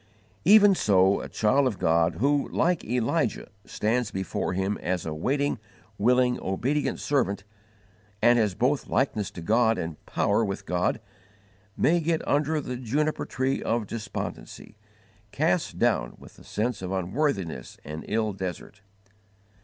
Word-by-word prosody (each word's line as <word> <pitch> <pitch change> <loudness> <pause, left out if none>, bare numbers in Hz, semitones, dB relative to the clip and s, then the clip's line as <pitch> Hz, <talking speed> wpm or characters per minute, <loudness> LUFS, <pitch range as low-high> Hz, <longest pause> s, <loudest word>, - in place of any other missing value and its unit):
Even 205 -1 +7
so 95 - +3
a - - -7
child 130 +6 +2
of 110 -6 -2
God 85 0 +2
who, 140 +8 +1
like 175 -1 +1
Elijah, 120 +3 -1 0.2
stands 115 +1 -1
before 95 -1 -3
Him 95 +2 -1
as 90 -1 -2
a 80 - -3
waiting, 140 - 0 0.4
willing, 125 +3 +3
obedient 125 +10 -1
servant, 115 -9 0 0.8
and 120 +2 +5
has 105 -5 +1
both 135 +6 +1
likeness 110 -6 0
to 85 - -9
God 110 +3 +3
and 80 -2 -5
power 100 +3 +1
with 100 -2 -4
God, 90 0 0 0.8
may 175 +2 +3
get 165 0 -1
under 150 +2 +1
the 125 -3 -5
juniper 145 +6 -1
tree 130 +1 -1
of 115 -1 -1
despondency, 110 +2 -6 0.6
cast - - 0
down - - +1
with - - -15
the - - -16
sense 110 0 -2
of 95 0 -4
unworthiness 95 - -2
and 75 +2 -6
ill 110 -1 0
desert. 95 +1 -6
115 Hz, 140 wpm, -26 LUFS, 95-140 Hz, 0.8 s, Even